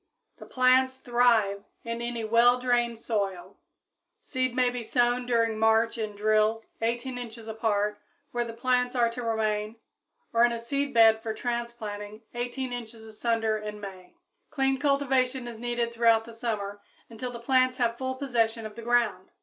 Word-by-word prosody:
_ - - -33
The - - -11
plants 260 +1 +3
thrive 235 -6 +2 0.2
in 230 0 -4
any 235 -1 -3
well 235 +3 +5
drained 240 -2 +1
soil. 200 -5 -3 0.6
Seed 255 -2 -1
may 250 -1 +3
be 245 -1 -4
sown 245 +1 +1
during 230 -2 +1
March 225 +1 +3
in 215 -2 -3
drills 215 +1 +2 0.2
18 240 +2 -2
inches 230 -2 -8
apart 210 -2 -1 0.3
where 240 0 0
the 235 - -6
plants 250 +2 0
are 235 -2 +3
to 245 +1 -6
remain 215 -1 -1 0.6
or 230 0 +5
in 240 0 +4
a - - -2
seedbed 230 -3 +3
for 220 -1 -4
transplanting 225 -3 -5
18 245 +1 -3
inches 230 -2 -7
asunder 220 0 -1
in 210 0 -6
May. 190 - -10 0.3
Clean 270 -3 0
cultivation 265 -3 +1
is 230 -2 -8
needed 240 0 -2
throughout 230 -1 +4
the 230 - -11
summer 210 -3 -4 0.3
until 230 +2 -6
the 235 - -7
plants 255 +1 +2
have 235 -1 0
full 260 0 -2
possession 230 -4 0
of 215 -1 -8
the 235 - -8
ground. 230 -5 +1
235 Hz, 165 wpm, -27 LUFS, 220-245 Hz, 0.6 s, well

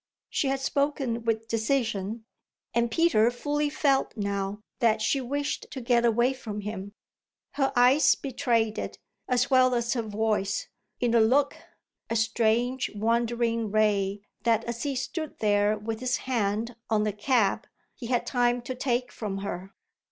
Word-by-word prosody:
She 280 - 0
had 270 0 0
spoken 270 -4 -1
with 225 0 0
decision, 225 -2 -1 0.5
and 235 0 +2
Peter 235 -5 +3
fully 290 +4 -1
felt 275 -4 +1
now 200 0 -2 0.2
that 225 -3 +3
she 225 +5 +1
wished 285 +3 -3
to 265 - -6
get 240 -1 +2
away 240 +3 +3
from 215 -5 -6
him. 200 -1 -6 0.6
Her 275 -1 0
eyes 250 +5 +5
betrayed 235 -5 0
it, - - -5 0.3
as 250 +1 +1
well 255 -1 +5
as 235 0 0
her 240 - 0
voice, 210 -2 -1 0.3
in 240 -1 +1
a 230 - +5
look, 270 +6 +3 0.5
a 230 - -1
strange, 230 +3 +1
wandering 230 +1 0
ray 205 -2 +1 0.2
that 225 0 +2
as 235 0 -5
he 285 -2 -1
stood 305 +4 -4
there 205 0 +2
with 220 +1 -4
his 255 0 0
hand 230 -1 -1
on 215 -1 +2
the 210 -1 -1
cab 215 0 +1 0.3
he 240 - -8
had 245 0 0
time 245 -1 +1
to 255 - -4
take 250 -1 -1
from 205 -3 -4
her. 190 0 -5
235 Hz, 155 wpm, -27 LUFS, 215-255 Hz, 0.6 s, eyes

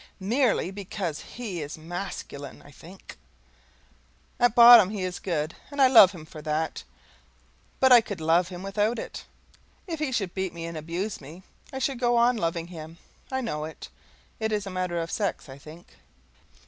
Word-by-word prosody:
MERELY 220 -1 +1
BECAUSE 190 -5 -5 0.2
HE 205 -9 -5
IS 145 +2 -6
MASCULINE, 165 -4 -7
I 145 - -15
think. 175 +7 -14 1.2
At 245 -2 +3
bottom 235 -5 +9
he 205 -3 -4
is 185 -1 -4
good, 160 -3 -3
and 285 0 -8
I 270 - +7
love 215 -7 +8
him 170 -5 -11
for 155 0 -11
that, 155 +1 -2 1.0
but 260 -1 +4
I 245 -2 +9
could 205 -5 -7
love 165 +2 +2
him 180 0 -8
without 210 +4 0
it. - - -7 0.6
If 330 -5 -5
he 305 -4 -1
should 200 -7 -2
beat 190 -2 -3
me 165 -1 -6
and 165 0 -6
abuse 170 +6 -4
me, 160 +7 -12 0.3
I 265 - -6
should 265 -1 -2
go 240 -1 +2
on 240 +1 +4
loving 170 -2 -2
him. 165 -1 -10 0.3
I 265 0 -1
know 150 -11 -3
it. 160 - -10 0.5
It 220 0 -1
is 210 -1 -1
a 195 - -6
matter 180 -2 -2
of 165 0 -4
sex, 200 -6 -2
I 135 0 -11
think. 155 +4 -15
185 Hz, 180 wpm, -26 LUFS, 165-225 Hz, 1.2 s, bottom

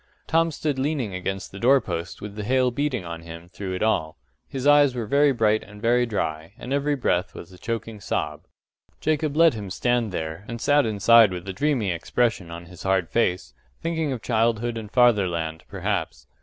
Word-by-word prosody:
Tom 165 +1 +2
stood 150 -3 -2
leaning 135 -7 -1
against 95 +1 -4
the 95 - -9
door 135 +5 +5
post 90 -5 -5
with 105 0 -7
the 105 - -5
hail 130 +3 +2
beating 125 -6 -2
on 85 -1 -6
him 85 +1 -10
through 95 0 -5
it 90 - -2
all. 80 -8 0 0.3
His 135 -1 -5
eyes 145 -2 +5
were 120 -2 -2
very 140 +5 +4
bright 110 -3 +2
and 105 0 -13
very 120 +2 +2
dry, 80 -6 -3
and 125 +4 -5
every 145 +1 +1
breath 100 -8 0
was 85 - -10
a 90 - -14
choking 115 -1 -4
sob. - - -2 0.6
Jacob 155 -1 0
let 165 -1 +6
him 105 -3 -6
stand 120 +2 0
there, 80 +1 -4
and 115 0 -5
sat 145 +1 +3
inside 110 0 +6
with 90 +1 -6
a 95 - -3
dreamy 120 -3 0
expression 95 +2 -1
on 85 +1 -8
his 90 -1 -13
hard 95 -3 +1
face, 95 -6 0 0.3
thinking 160 -3 -1
of 125 -4 -5
childhood 115 0 +1
and 110 -2 -6
fatherland, 90 -10 +2
perhaps. - - -3
110 Hz, 195 wpm, -24 LUFS, 95-130 Hz, 0.6 s, let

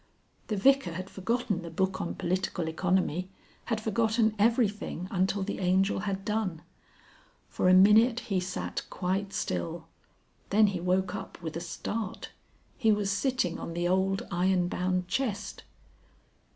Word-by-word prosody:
The 215 - -1
Vicar 270 -4 +3
had 185 +3 -6
forgotten 205 -1 -1
the 170 - -7
book 185 +3 -1
on 170 - -3
Political 180 -1 -1
Economy, 180 +1 0 0.4
had 225 -2 -1
forgotten 220 0 +1
everything 210 -5 +1
until 190 +1 +1
the 205 - -4
Angel 190 +1 +2
had 195 -1 -3
done. 210 -7 -2 0.9
For 180 - +1
a 185 - +7
minute 220 +5 +6
he 195 -3 -1
sat 180 +1 -3
quite 190 +2 -2
still. 85 - -3 0.6
Then 215 +2 +5
he 180 - -2
woke 180 +1 0
up - - -7
with 160 -1 -5
a - - -2
start. 205 +4 -5 0.5
He 225 -4 +4
was 205 -1 +1
sitting 240 -5 0
on 170 - -6
the 175 0 0
old 190 +2 +1
iron 180 0 +2
bound 180 0 -1
chest. 225 0 -2
190 Hz, 145 wpm, -29 LUFS, 180-215 Hz, 0.9 s, a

